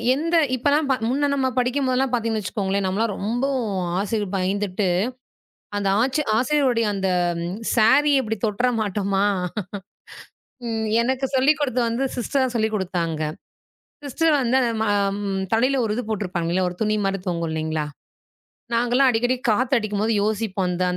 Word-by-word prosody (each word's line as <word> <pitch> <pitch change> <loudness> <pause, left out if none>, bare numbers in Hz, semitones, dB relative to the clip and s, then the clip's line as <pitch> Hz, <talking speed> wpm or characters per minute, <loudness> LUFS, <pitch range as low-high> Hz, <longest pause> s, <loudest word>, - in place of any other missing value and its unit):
எந்த 330 +4 -1 0.2
இப்ப 255 +3 -2
எல்லாம் 290 +1 +2 0.2
முன்ன 285 +3 +1
நம்ம 270 -2 +1
படிக்கம்போது 255 +1 0
எல்லாம் 265 -1 +1
பாத்தீங்கன்னு 225 -2 0
வச்சுக்கோங்களேன், 195 0 -2
நம்ம 190 +1 -1
எல்லாம் 225 -2 +1
ரொம்போ 235 +7 -1 0.5
ஆசிரியர் 205 -1 -2
பயந்துட்டு 195 +1 -1 0.9
அந்த 200 -1 0
ஆச்சி 265 +4 +1
ஆசிரியர் 260 -1 +2
அந்தச் 180 -3 0 0.4
சாரி 260 +7 +5
இப்டி 220 -3 -2
தொட்டுற 220 +4 0
மாட்டமா? 200 -1 0 1.8
எனக்குச் 260 +2 -1
சொல்லிக்கொடுத்து 265 -2 +2
வந்து 235 +4 -1
சிஸ்டர் 260 +1 0
சொல்லிக்கொடுத்தாங்க. 185 -7 -1 0.9
சிஸ்டர் 320 +4 +1
வந்து, 250 0 +1 0.4
ஆ - - +2 0.2
ம - - -5 0.3
தலையில 255 +4 +2
ஒரு 210 - -1
இது 245 - -2
போட்டிருப்பாங்க 180 -5 -2
இல்ல 185 - +1
ஒரு 180 - -9
துணி 215 0 +2
மாதிரி 195 0 -1
தொங்கும் 170 -2 -1
இல்லீங்களா? 160 -1 -2 0.9
நாங்கல்லாம் 245 +3 +3
அடிக்கடி 245 +2 +1 0.2
காத்து 255 +5 +1
அடிக்கும்போது 215 0 -1
யோசிப்போம். 210 -3 -1
அந்த 180 +1 -1
225 Hz, 135 wpm, -23 LUFS, 195-255 Hz, 1.8 s, சாரி